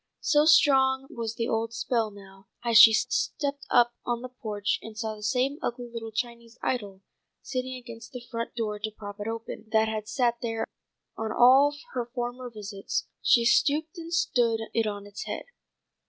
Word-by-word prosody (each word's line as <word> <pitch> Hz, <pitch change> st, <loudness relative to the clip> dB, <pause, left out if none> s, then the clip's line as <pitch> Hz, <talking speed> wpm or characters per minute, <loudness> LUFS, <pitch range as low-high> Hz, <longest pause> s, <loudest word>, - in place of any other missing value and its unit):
So 295 Hz, 0 st, +4 dB
strong 270 Hz, -4 st, +5 dB
was 230 Hz, -1 st, -4 dB
the 230 Hz, 0 st, -1 dB
old 225 Hz, -1 st, -1 dB
spell 230 Hz, -1 st, 0 dB
now, 195 Hz, -1 st, -15 dB, 0.2 s
that 235 Hz, -, 0 dB
as 225 Hz, -, +8 dB
she 230 Hz, -1 st, +11 dB
stepped 285 Hz, +5 st, -1 dB
up 240 Hz, 0 st, +4 dB
on 240 Hz, 0 st, -2 dB
the 255 Hz, -, -6 dB
porch 210 Hz, -5 st, -2 dB
and 220 Hz, -1 st, -10 dB
saw 220 Hz, -1 st, -2 dB
the 210 Hz, -, -12 dB
same 255 Hz, +6 st, 0 dB
ugly 240 Hz, 0 st, -4 dB
little 225 Hz, -1 st, -6 dB
Chinese 235 Hz, +1 st, -5 dB
idol 200 Hz, -6 st, -2 dB, 0.4 s
sitting 255 Hz, 0 st, -3 dB
against 235 Hz, -2 st, -10 dB
the 245 Hz, -1 st, -8 dB
front 230 Hz, 0 st, -4 dB
door 215 Hz, -3 st, -2 dB
to 215 Hz, +1 st, -3 dB
prop 205 Hz, -1 st, -9 dB
it 205 Hz, -, -4 dB
open, 225 Hz, -1 st, -6 dB
that 220 Hz, 0 st, +4 dB
had 215 Hz, -1 st, -3 dB
sat 240 Hz, -2 st, 0 dB
there 225 Hz, -1 st, -2 dB, 0.5 s
on 220 Hz, -1 st, -3 dB
all 265 Hz, +5 st, +6 dB, 0.2 s
her 245 Hz, -2 st, -3 dB
former 245 Hz, +1 st, -4 dB
visits, 205 Hz, -3 st, -4 dB
she 235 Hz, -2 st, +4 dB
stooped 310 Hz, +7 st, +3 dB
and 335 Hz, 0 st, -8 dB
stood 240 Hz, -9 st, +2 dB
it 225 Hz, -1 st, +1 dB
on 205 Hz, -1 st, -4 dB
its 205 Hz, 0 st, -7 dB
head. -, -, -5 dB
235 Hz, 185 wpm, -27 LUFS, 220-255 Hz, 0.5 s, she